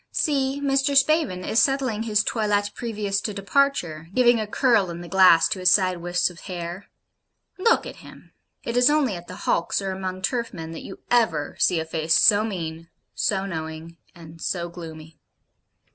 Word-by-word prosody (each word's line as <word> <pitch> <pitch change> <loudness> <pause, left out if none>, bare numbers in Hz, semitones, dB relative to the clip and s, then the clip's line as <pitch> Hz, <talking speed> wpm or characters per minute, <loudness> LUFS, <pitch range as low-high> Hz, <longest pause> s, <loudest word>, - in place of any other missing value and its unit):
See 275 -3 0
Mr. 275 0 +1
Spavin 275 - +2
is 220 - +2
settling 260 -4 0
his 215 -2 +1
toilette 205 -3 0
previous 210 -4 -3
to 210 -1 -4
departure; 200 - 0
giving 240 -2 +4
a 215 - -3
curl 220 -4 +2
in 170 0 -7
the 175 - -9
glass 185 -3 +5
to 190 - -3
his 185 0 +4
side 185 -2 +3
wisps 175 +1 0
of 170 - -15
hair. 175 0 -7 0.7
Look 460 +5 +2
at - - -9
him! - - -15 0.3
It 235 - -4
is 245 +3 +5
only 290 -9 +1
at 175 0 -10
the - - -9
hulks, 170 - 0
or 195 -1 -3
among 185 0 -5
turf 235 -3 -2
men, 160 -1 -7
that 165 - -8
you 195 - -10
ever 175 -12 +1
see 175 - +2
a 160 - -3
face 160 0 +1
so 205 0 +5
mean, 165 -6 -5 0.2
so 195 -1 -1
knowing, 160 -1 -7 0.2
and 165 -1 -13
so 175 -2 -3
gloomy. 160 -2 -11
190 Hz, 180 wpm, -23 LUFS, 170-235 Hz, 0.7 s, glass